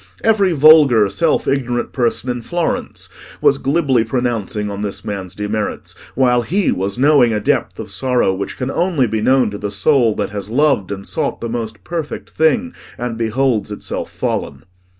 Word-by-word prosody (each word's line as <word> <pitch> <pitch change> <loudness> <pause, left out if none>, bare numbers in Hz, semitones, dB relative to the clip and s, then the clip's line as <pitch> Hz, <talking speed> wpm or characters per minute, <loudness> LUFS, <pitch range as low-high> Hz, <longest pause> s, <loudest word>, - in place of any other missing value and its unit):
Every 210 -4 +3
vulgar 145 -8 +6
self 160 +10 0
ignorant 120 -3 -1
person 125 0 0
in 120 -1 -4
Florence 175 +6 -3 0.3
was - - +3
glibly 135 -5 +1
pronouncing 115 -3 -2
on 100 0 -5
this 105 0 -4
man's 100 -3 -5
demerits, 105 +1 -3 0.2
while 125 -2 +3
he 185 - 0
was 95 +3 -2
knowing 135 -3 +4
a 105 - 0
depth 105 - -1
of 105 -2 -7
sorrow 125 -1 +1
which 95 +1 -5
can 130 +1 -3
only 170 -7 +1
be 110 -1 -2
known 130 -2 +3
to 100 - -6
the 105 - -3
soul 115 +2 +2
that - - -3
has 100 -1 -6
loved 125 -6 +1
and 100 -1 -5
sought - - -2
the 115 - -4
most 110 -4 -5
perfect 165 - -5
thing, 230 +11 +1 0.2
and 120 -1 -4
beholds 115 -1 0
itself 105 - -5
fallen. - - -3
120 Hz, 170 wpm, -18 LUFS, 105-140 Hz, 0.3 s, vulgar